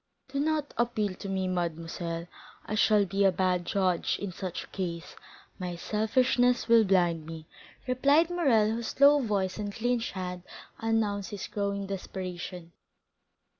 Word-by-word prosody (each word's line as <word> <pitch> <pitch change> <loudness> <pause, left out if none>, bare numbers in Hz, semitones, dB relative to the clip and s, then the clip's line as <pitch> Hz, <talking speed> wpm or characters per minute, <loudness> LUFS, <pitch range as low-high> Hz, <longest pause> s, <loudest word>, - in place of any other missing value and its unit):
"Do 275 +1 -3
not 300 0 0
appeal 215 -4 0
to 195 +2 -8
me, 190 -1 -1
mademoiselle; 170 -1 -3 0.4
I - - -5
shall 215 -1 +4
be 195 +2 0
a 195 - +5
bad 180 -1 0
judge 185 -3 +1
in 200 -2 -4
such 180 0 -5
a - - -14
case; 170 -3 -5 0.4
my 180 -1 -4
selfishness 245 +6 +2
will 230 -1 +6
blind 175 -5 +2
me," 160 -1 -8 0.4
replied 280 +7 +3
Morrel, 245 -12 +3
whose 230 +3 -4
low 285 +1 +7
voice 200 -4 -1
and 205 -1 -3
clenched 235 +2 -1
hands 180 -2 -5 0.4
announced 215 -3 0
his 205 - -5
growing 200 -1 -2
desperation. 180 -2 -6
200 Hz, 145 wpm, -29 LUFS, 180-230 Hz, 0.4 s, low